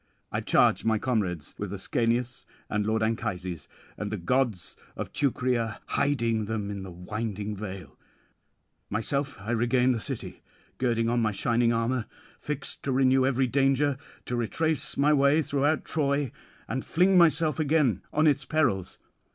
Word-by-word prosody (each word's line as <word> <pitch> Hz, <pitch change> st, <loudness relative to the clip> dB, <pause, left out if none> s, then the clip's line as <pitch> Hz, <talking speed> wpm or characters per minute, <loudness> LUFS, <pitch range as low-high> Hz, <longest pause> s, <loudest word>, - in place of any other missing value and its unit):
I -, -, -1 dB
charge -, -, +3 dB
my 110 Hz, -1 st, +2 dB
comrades 100 Hz, -, -2 dB
with -, -, -4 dB
Ascanius 120 Hz, +2 st, -1 dB, 0.2 s
and 105 Hz, -1 st, 0 dB
lord 110 Hz, 0 st, +1 dB
Anchises, 95 Hz, -7 st, -3 dB, 0.3 s
and 105 Hz, -, -3 dB
the 105 Hz, -, -2 dB
gods 110 Hz, 0 st, 0 dB, 0.2 s
of -, -, -6 dB
Teucria, 125 Hz, -5 st, 0 dB
hiding 115 Hz, -6 st, +1 dB
them 105 Hz, -1 st, -3 dB
in 100 Hz, -1 st, -5 dB
the 95 Hz, -, -7 dB
winding 105 Hz, +3 st, -4 dB
vale. 95 Hz, -8 st, -8 dB, 0.9 s
Myself 140 Hz, +7 st, -1 dB
I 105 Hz, +4 st, -5 dB
regain 125 Hz, +2 st, +2 dB
the 120 Hz, -, 0 dB
city, -, -, -6 dB, 0.4 s
girding 115 Hz, -2 st, +1 dB
on 120 Hz, +1 st, +1 dB
my 110 Hz, -1 st, +1 dB
shining 115 Hz, +4 st, +2 dB
armour; 115 Hz, 0 st, 0 dB, 0.3 s
fixed 150 Hz, -2 st, -3 dB
to 140 Hz, -, 0 dB
renew 130 Hz, 0 st, +4 dB
every 135 Hz, 0 st, +2 dB
danger, 135 Hz, +2 st, +2 dB, 0.3 s
to 125 Hz, -, -3 dB
retrace 155 Hz, +7 st, 0 dB
my 145 Hz, +2 st, +4 dB
way 145 Hz, +2 st, +4 dB
throughout 145 Hz, +2 st, 0 dB
Troy, 140 Hz, -4 st, 0 dB, 0.4 s
and 130 Hz, +3 st, -3 dB
fling 185 Hz, +3 st, +3 dB
myself 160 Hz, -3 st, +4 dB
again 145 Hz, -, +2 dB
on 155 Hz, +1 st, +2 dB
its 140 Hz, -2 st, +3 dB
perils. 125 Hz, -, 0 dB
120 Hz, 150 wpm, -27 LUFS, 110-140 Hz, 0.9 s, renew